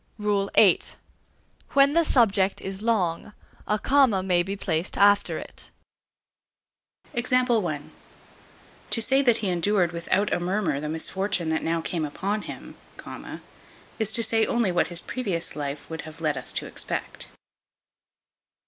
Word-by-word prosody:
VII. 205 -2 +3 0.9
When 280 +1 +5
the 335 +1 +4
subject 200 -9 +3
is 195 +1 -6
long, 210 -4 -1 0.3
a 210 - +1
comma 255 -6 +3
may 180 -2 +2
be 195 +3 -4
placed 180 -3 -2
after 205 0 +4
it. - - -10 1.5
To 250 +1 +1 1.5
say 265 +4 +3
that 240 -4 +4
he 205 -4 -1
endured 180 0 +1
without 185 +4 0
a - - +1
murmur 175 -5 -1
the 150 +1 -4
misfortune 180 +2 -1
that 160 - 0
now 165 0 -1
came 165 0 -3
upon 195 +8 -2
him, - - -9 1.3
is 220 -1 -1
to 230 - +2
say 225 -1 +3
only 235 -5 +1
what 175 - +1
his 175 0 +1
previous 195 -10 -3
life 145 -1 -5
would 160 -1 -6
have 155 +1 -11
led 155 -2 0
us - - -2
to - - -1
expect. - - -2
195 Hz, 135 wpm, -25 LUFS, 170-220 Hz, 1.5 s, When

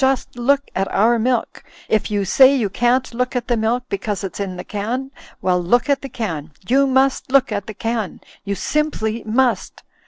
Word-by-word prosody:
Just 265 -2 +1
look 275 +4 +2
at 195 +1 -1
our 230 +3 +3
milk! 245 +1 -1 0.2
If 215 - +1
you 205 -2 0
say 265 +8 +6
you 225 -7 0
can't 245 +3 +1
look 250 +2 -2
at 245 -1 -2
the 240 - +2
milk, 230 +2 0
because 205 -1 -3
it's 195 - -5
in 195 -2 -3
the 180 - -6
can 240 +6 -3
— - - -23
^well, 180 -1 +2
look 245 +10 +2
at 280 - +1
the 275 - -7
can! 165 - -4 0.2
You 275 +3 +4
must 265 0 +1
look 275 -2 +4
at 205 -2 -3
the 215 - -7
can! 225 -2 -3 0.2
You 200 0 -2
simply 235 -6 -1
must 245 +2 0
235 Hz, 200 wpm, -20 LUFS, 205-260 Hz, 0.2 s, say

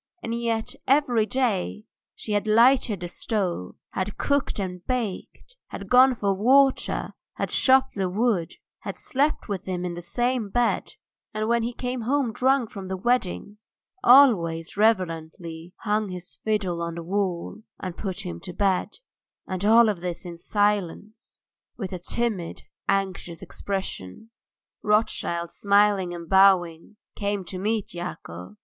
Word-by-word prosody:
And 230 - -3
yet, 235 +1 -2
every 250 -6 +3
day, 215 -5 -1 0.3
she 215 - -6
had 205 +1 0
lighted 230 -2 +4
the 175 - -3
stove, 180 - -3 0.2
had 190 +2 -3
cooked 285 -1 0
and 180 -3 -4
baked, 250 - -4
had - - -9
gone 255 +1 +7
for 205 -3 -1
the 195 0 -1
water, 270 +3 +3 0.2
had - - -2
chopped 265 0 +4
the 190 -2 -1
wood, 200 -3 0 0.3
had - - -6
slept 285 +3 -1
with 195 -3 -4
him 180 -1 -3
in 175 - -3
the 175 - -6
same 240 +5 -1
bed, 240 +3 0 0.4
and 215 0 -1
when 235 0 +2
he 235 +2 -2
came 250 0 -4
home 255 0 0
drunk 260 -1 +2
from 195 -2 -7
the 190 0 -3
weddings 210 -1 -2 0.2
always 180 - +5
reverently 165 -5 -1
hung 210 -1 0
his 180 -1 -8
fiddle 195 -6 -2
on 170 0 -3
the 170 - -6
wall 190 +1 -2 0.2
and 185 -2 -5
put 190 -1 -4
him 180 - -5
to 180 - -8
bed, 195 0 0 0.5
and 185 0 -4
all 225 +3 +7
this 175 -1 -6
in 175 -1 -7
silence, 205 +3 -2 0.4
with 190 -5 -5
a 180 - -4
timid, 200 -2 -3 0.3
anxious 190 -4 -1
expression. 195 - -5 0.5
Rothschild, 175 -5 0
smiling 200 -2 +3
and 170 -1 -7
bowing, 190 -1 +3 0.2
came 200 -2 -2
to 185 +1 -6
meet 215 +1 -1
Yakov. 100 - -7
200 Hz, 145 wpm, -25 LUFS, 180-230 Hz, 0.5 s, gone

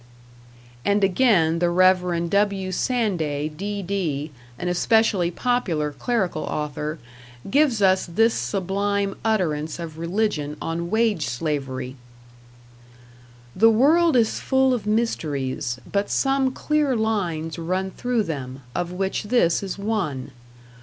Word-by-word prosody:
And 200 +4 +2
again, 185 -6 +3
the 175 0 +2
Rev. 180 -1 +3
W. 200 -2 +1
Sanday, 175 - -1
D.D., 180 -4 -3 0.3
an 180 - -4
especially 185 0 +2
popular 175 - -1
clerical 185 - -1
author, 150 +1 -3 0.5
gives 270 -8 +3
us 190 -1 +3
this 225 +7 +3
sublime 200 +1 -1
utterance 160 -8 0
of 165 -2 -7
religion 170 -4 -1
on 170 +1 -3
wage 220 - +1
slavery: 130 -1 -3 1.6
The 225 +4 +6
world 300 +8 +4
is 225 -2 +2
full 265 -1 +2
of 230 -4 -3
mysteries, 145 - -1
but 200 0 0
some 270 -1 +1
clear 300 -1 0
lines 180 -8 -1
run 185 +3 -2
through 245 0 -1
them, 135 -6 -6
of 175 0 -2
which 190 +3 -2
this 205 -7 +2
is 195 -1 -5
one. 180 - -2
190 Hz, 115 wpm, -23 LUFS, 160-220 Hz, 1.6 s, The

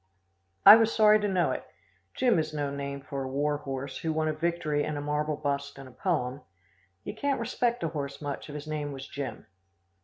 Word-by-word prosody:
I 205 +2 +12
was 225 0 +3
sorry 215 -1 +6
to 210 - 0
know 185 -3 +2
it. - - -3 0.5
Jim 245 -9 +3
is 155 -1 -3
no 145 -1 -1
name 140 0 -5
for 135 0 -5
a 135 - -3
war 145 +2 0
horse 135 -1 -5
who 165 -2 -1
won 155 0 0
a 155 - +1
victory 155 -2 -1
and 150 0 -3
a - - -2
marble 150 +1 -1
bust 140 -2 -3
and 135 -1 -9
a - - -13
poem. 140 -4 -1 0.6
You - - -5
can't 285 -1 -1
respect 235 -1 -1
a 165 - 0
horse 140 -3 -5
much 145 0 -5
if 145 - -7
his 150 0 -6
name 150 -2 -3
was 135 0 -8
Jim. 140 -3 -6
150 Hz, 215 wpm, -28 LUFS, 140-170 Hz, 0.6 s, I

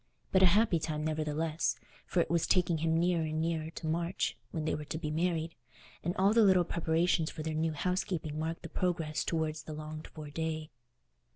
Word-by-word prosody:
But 190 - +4
a 190 - +8
happy 200 -1 +4
time, 155 -1 -2
nevertheless, 155 +1 0 0.3
for 175 - +2
it - - -1
was 170 -1 +2
taking 175 -3 +3
him 165 +1 +2
nearer 175 0 +2
and 155 0 -2
nearer 160 -1 -1
to - - -6
March, 170 +3 0
when 160 -2 -3
they - - +1
were 150 - -3
to 155 - -4
be 155 -2 -3
married, 165 0 0 0.5
and 175 +2 -1
all 195 +3 +4
the 230 - +6
little 190 -3 +6
preparations 165 -1 +1
for 155 - -6
their 160 0 -2
new 160 +1 0
housekeeping 165 -2 -1
marked 165 +1 -3
the - - -6
progress 165 -4 -1
towards 160 -1 -1
the 155 0 -7
longed 155 0 -7
for 150 -2 -9
day. 160 0 -3
160 Hz, 200 wpm, -32 LUFS, 155-175 Hz, 0.5 s, a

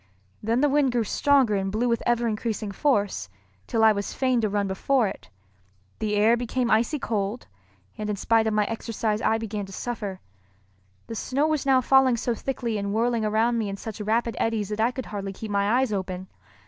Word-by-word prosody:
Then 230 +4 +1
the 295 - +4
wind 280 -2 +3
grew 240 -2 +2
stronger 270 0 +3
and 195 -1 -1
blew 225 +4 0
with 235 -1 +1
ever 240 0 +2
increasing 215 -1 -2
force, 200 - 0 0.4
till 225 - +1
I 220 - +8
was 200 -1 -3
fain 255 -3 +2
to 215 - +1
run 200 0 0
before 225 +5 +1
it. - - -8 0.7
The 210 -1 -1
air 215 +3 +5
became 245 0 -1
icy 230 +8 +2
cold, 215 -3 -2 0.5
and 210 0 -3
in 210 - 0
spite 225 +2 +2
of 220 - 0
my 210 -1 +3
exercise 225 -1 -2
I 220 - +2
began 210 -3 -4
to - - -11
suffer. 205 -3 -4 0.9
The - - -7
snow 265 +6 0
was 310 -3 0
now 260 -1 +5
falling 260 -1 +4
so 240 +1 -1
thickly 235 -3 -3
and 200 0 -2
whirling 230 0 +1
around 225 +2 +2
me 215 -3 -1
in 195 - -5
such 220 +1 -7
rapid 225 +2 0
eddies 220 -3 0
that 210 0 -4
I 230 - +4
could 255 0 -6
hardly 195 -2 -5
keep 215 +2 -7
my 200 0 +1
eyes 260 -5 0
open. 185 -1 -4
225 Hz, 205 wpm, -25 LUFS, 205-240 Hz, 0.9 s, I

